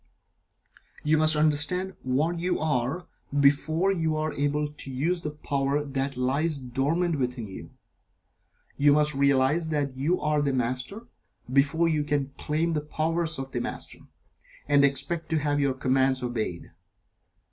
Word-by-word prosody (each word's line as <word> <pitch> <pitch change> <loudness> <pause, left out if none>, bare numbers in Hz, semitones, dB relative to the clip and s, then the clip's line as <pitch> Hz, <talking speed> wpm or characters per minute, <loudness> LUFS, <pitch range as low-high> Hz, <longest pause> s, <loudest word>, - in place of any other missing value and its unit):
You 155 +1 +2
must 155 0 +5
understand 155 +5 +3
what 150 +7 0
you 180 +2 0
are, 145 +2 -1 0.3
before 155 +6 +3
you 160 -4 0
are 155 0 -2
able 145 +1 0
to 145 -2 -9
use 160 +7 -1
the 155 - -3
power 145 -1 -1
that 135 -1 -2
lies 140 +5 0
dormant 145 +6 -1
within 125 -3 -3
you. 95 - -10 1.1
You 145 0 +5
must 150 0 +4
realize 140 +3 +2
that 145 -4 -2
you 150 +8 0
are 150 -1 +1
the 140 -2 0
Master, 130 - -2 0.5
before 145 +5 +3
you 155 -2 +1
can 145 -2 -1
claim 160 +3 -1
the 155 -2 -1
powers 160 +2 -1
of 135 0 -6
the 120 - -2
Master, - - -6 0.7
and 145 0 +4
expect 140 +5 +1
to 160 - +1
have 145 -1 0
your 140 -2 +1
commands 130 0 +1
obeyed. 110 -8 -4
145 Hz, 145 wpm, -26 LUFS, 135-160 Hz, 1.1 s, must